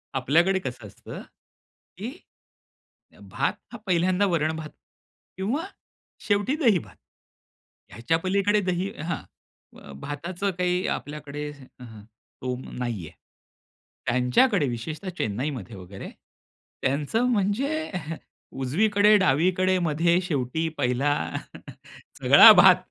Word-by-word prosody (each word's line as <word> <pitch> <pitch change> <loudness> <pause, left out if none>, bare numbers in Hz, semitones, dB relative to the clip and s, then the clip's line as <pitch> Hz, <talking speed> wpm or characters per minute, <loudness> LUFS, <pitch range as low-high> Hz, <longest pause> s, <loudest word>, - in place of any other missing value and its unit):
आपल्याकडे 170 +8 +2
कसं 125 - -7
असतं, - - -10 0.8
की 215 +7 -5 1.0
अ, - - -20
भात - - -1 0.2
हा - - -7
पहिल्यांदा 185 +2 +2
वरण-भात 160 -3 -1 0.7
किंवा 230 - -2 0.6
शेवटी 205 +8 +1
दही-भात. 225 - +1 0.9
ह्याच्या 120 +10 -1
पलीकडे 200 +3 +1
दही 185 0 -1
हां. 165 -2 -3 0.6
अ, 70 - -12
भाताचं 170 +7 -3
काही 180 0 0
आपल्याकडे 150 0 -5
हं. 125 -6 -13
स्तोम 125 +3 -8
नाही 115 -9 -3
आहे. - - -19 0.9
त्यांच्याकडे 125 - +3
विशेषतः 155 - -5
चेन्नईमध्ये 115 -1 -3
वगैरे 95 +1 -9 0.7
त्यांचं 145 - 0
म्हणजे 260 +10 -1 0.7
उजवीकडे-डावीकडे, 185 +1 +3
मध्ये, 170 +2 +2
शेवटी, 160 -1 -1
पहिला, 125 +4 +1 1.1
सगळा - - +10
भात. - - +7
165 Hz, 95 wpm, -25 LUFS, 130-195 Hz, 1.1 s, सगळा